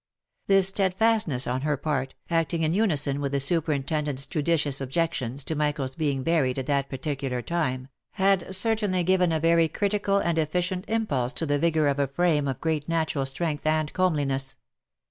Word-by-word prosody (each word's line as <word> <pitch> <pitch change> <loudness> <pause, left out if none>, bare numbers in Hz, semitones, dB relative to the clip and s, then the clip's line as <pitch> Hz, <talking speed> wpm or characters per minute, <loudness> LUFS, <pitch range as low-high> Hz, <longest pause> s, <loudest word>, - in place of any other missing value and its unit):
This 195 -1 +5
steadfastness 195 - +1
on 125 +2 -2
her 150 0 0
part, 135 -2 -2 0.2
acting 165 0 0
in 155 +1 +1
unison 150 -9 +1
with 140 -1 -2
the 140 - +1
superintendent's 150 -2 -1
judicious 150 -4 -1
objections 135 -2 -2
to 160 - 0
Michael's 150 -3 -1
being 140 -3 -1
buried 145 -6 +1
at 135 - -3
that 140 -1 0
particular 135 -2 -3
time, 130 -7 -2 0.3
had 190 -1 +1
certainly 205 -2 +1
given 180 -1 +2
a 160 - +1
very 165 +1 +3
critical 200 +3 0
and 170 -4 0
efficient 180 +4 -1
impulse 145 - -1
to 165 - -1
the 145 -1 0
vigour 160 -1 +2
of 140 0 0
a 140 - +2
frame 150 0 +1
of 135 -3 -3
great 160 -1 -1
natural 160 -4 0
strength 150 +2 -2
and 155 -1 0
comeliness. 140 -7 0
155 Hz, 165 wpm, -26 LUFS, 140-175 Hz, 0.3 s, This